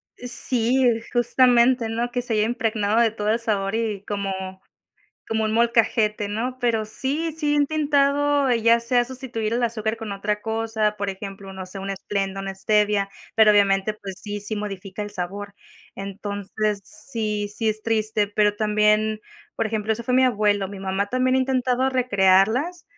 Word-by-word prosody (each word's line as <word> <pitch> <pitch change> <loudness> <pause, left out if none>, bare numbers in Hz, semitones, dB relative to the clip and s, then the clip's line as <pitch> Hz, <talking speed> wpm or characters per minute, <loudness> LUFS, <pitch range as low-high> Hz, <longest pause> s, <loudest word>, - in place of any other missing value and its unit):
Sí, 245 +1 +1 0.3
justamente, 245 -1 +3
¿no?, 235 +2 -2
que 245 0 -2
se 235 -2 -3
haya 210 0 +2
impregnado 220 -2 0
de 230 -2 +4
todo 210 -1 -3
el 225 +2 +2
sabor 200 -3 -1
y 215 -3 -2
como 200 -2 -2 1.0
como 220 0 0
un 215 - -1
molcajete, 225 -2 +2
¿no?, 245 +5 -3
pero 225 -3 +1
sí, 285 +9 -2
sí 300 -1 -1
he - - +2
intentado, 290 -1 +2
ya 230 0 +4
sea 240 +1 +2
sustituir 245 -4 -4
el 245 - 0
azúcar 220 -1 -1
con 225 -2 -7
otra 210 +1 -2
cosa, 220 -1 -1
por 200 0 -2
ejemplo, 195 0 -8
no 190 -1 -7
sé, 185 +2 -8
un 195 0 -4
Splenda, 195 0 -3
una 195 0 -5
Stevia, 205 0 +1 0.3
pero 215 -1 +7
obviamente 200 0 +3
pues 195 -3 -8
sí, 205 -1 -5
si 210 +1 -4
modifica 195 -1 -6
el 205 - -6
sabor. 200 +1 -5 0.4
Entonces, 200 +1 -3
sí, 220 -9 -3
sí 225 0 0
es 215 0 -4
triste, 215 -2 +1
pero 210 0 +1
también, 215 0 +2 0.4
por 225 - 0
ejemplo, 220 0 -1
eso 235 - -4
fue 250 - -2
mi 260 +1 +5
abuelo. 205 -4 +2
Mi 200 -1 -9
mamá 195 +1 -1
también 255 +3 +1
ha - - +3
intentado 260 0 +1
recrearlas 245 - +2
220 Hz, 170 wpm, -23 LUFS, 205-245 Hz, 1.0 s, pero